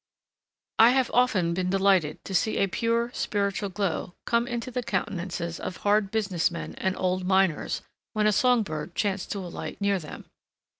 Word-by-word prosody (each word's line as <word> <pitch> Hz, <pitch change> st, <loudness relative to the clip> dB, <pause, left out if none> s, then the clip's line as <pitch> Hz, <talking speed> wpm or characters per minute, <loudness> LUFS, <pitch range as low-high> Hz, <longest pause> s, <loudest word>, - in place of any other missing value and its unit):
I 225 Hz, -, +9 dB
have 260 Hz, -2 st, +1 dB
often 205 Hz, -9 st, +3 dB
been 180 Hz, +1 st, -1 dB
delighted 190 Hz, -5 st, +2 dB
to 195 Hz, -, -6 dB
see 215 Hz, +4 st, +1 dB
a -, -, +3 dB
pure, 230 Hz, +4 st, 0 dB
spiritual 200 Hz, -1 st, -1 dB
glow 185 Hz, -2 st, -2 dB
come 235 Hz, +1 st, +1 dB
into 240 Hz, 0 st, -4 dB
the 250 Hz, -, -2 dB
countenances 175 Hz, -6 st, -3 dB
of 180 Hz, -, -5 dB
hard 205 Hz, -1 st, +2 dB
business 195 Hz, -6 st, +1 dB
men 170 Hz, -, -6 dB
and 190 Hz, 0 st, -1 dB
old 185 Hz, 0 st, 0 dB
miners, 190 Hz, -3 st, +1 dB, 0.3 s
when 215 Hz, -1 st, +1 dB
a 215 Hz, -, +5 dB
song 245 Hz, +2 st, +3 dB
bird 155 Hz, -5 st, -6 dB
chanced 200 Hz, -2 st, -1 dB
to 200 Hz, -, -4 dB
alight 175 Hz, -, -6 dB
near 200 Hz, -1 st, +1 dB
them. 155 Hz, -, -9 dB
195 Hz, 170 wpm, -27 LUFS, 180-220 Hz, 0.3 s, I